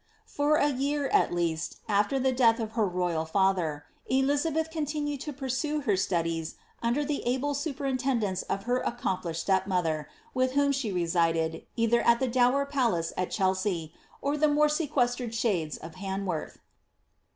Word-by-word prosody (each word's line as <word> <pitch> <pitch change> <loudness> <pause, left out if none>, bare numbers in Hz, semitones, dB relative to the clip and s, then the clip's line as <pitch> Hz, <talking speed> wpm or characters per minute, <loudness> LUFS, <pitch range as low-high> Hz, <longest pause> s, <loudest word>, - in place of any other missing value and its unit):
For 290 +1 +1
a 295 -1 +3
year, 280 +1 -1
at - - +3
least, 170 -2 -1
after 210 +5 +2
the 265 0 +2
death 240 -3 +4
of 220 -1 -3
her 220 -2 +1
royal 175 -3 -1
father, 165 -4 +1 0.2
Elizabeth 290 +4 +1
con 315 -3 -2
tiooed 290 -1 -2
to 295 - -5
pursue 285 +2 -2
her 210 -7 +2
studies 165 -3 -1 0.3
under 240 +5 +1
the 290 0 -2
able 265 +4 0
superintendence 265 - -1
of 195 0 -1
her 245 +3 0
ac 240 - -2
complished 175 -6 -2
stepmother, 180 -6 0 0.2
with 255 0 +1
whom 285 0 +3
she 270 -6 -1
resided, 165 -2 0
either 235 0 +3
at 235 0 +4
the 260 - +1
dower 255 +3 +3
palace 235 - 0
at 180 - -1
Chelsea, 185 -4 0 0.3
or 285 +1 0
the 305 +1 +4
more 300 +1 +4
sequestered 250 -6 0
shades 185 -10 0
of 165 0 -10
Han 195 +1 -4
worth. 165 -5 -3
235 Hz, 165 wpm, -28 LUFS, 180-280 Hz, 0.3 s, death